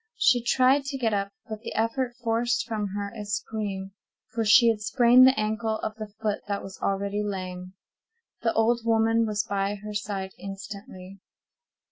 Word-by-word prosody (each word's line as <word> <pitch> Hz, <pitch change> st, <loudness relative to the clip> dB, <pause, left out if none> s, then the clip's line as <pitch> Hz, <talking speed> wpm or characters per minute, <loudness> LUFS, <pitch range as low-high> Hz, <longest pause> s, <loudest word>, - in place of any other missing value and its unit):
She 245 Hz, -, +4 dB
tried 260 Hz, +3 st, +3 dB
to 275 Hz, 0 st, -3 dB
get 230 Hz, -4 st, 0 dB
up, 200 Hz, 0 st, -1 dB, 0.2 s
but 215 Hz, -1 st, -6 dB
the -, -, -7 dB
effort 240 Hz, +2 st, 0 dB
forced 230 Hz, +1 st, +1 dB
from 215 Hz, -2 st, -2 dB
her 200 Hz, 0 st, -4 dB
a 215 Hz, -, -5 dB
scream, 205 Hz, -2 st, -4 dB, 0.4 s
for 230 Hz, -, -1 dB
she 230 Hz, +3 st, +7 dB
had 220 Hz, -2 st, 0 dB
sprained 245 Hz, +3 st, +6 dB
the 260 Hz, -, +3 dB
ankle 220 Hz, +1 st, -1 dB
of 215 Hz, -, -2 dB
the 215 Hz, -1 st, -7 dB
foot 210 Hz, -2 st, 0 dB
that 200 Hz, -1 st, -2 dB
was 190 Hz, -1 st, -9 dB
already 200 Hz, +1 st, -1 dB
lame. 185 Hz, -2 st, -5 dB, 0.7 s
The 230 Hz, -, +2 dB
old 235 Hz, +2 st, +2 dB
woman 225 Hz, 0 st, +3 dB
was 210 Hz, -1 st, 0 dB
by 200 Hz, 0 st, -1 dB
her 210 Hz, +1 st, -8 dB
side 200 Hz, -2 st, -3 dB
instantly. 195 Hz, -1 st, -9 dB
215 Hz, 170 wpm, -26 LUFS, 200-230 Hz, 0.7 s, she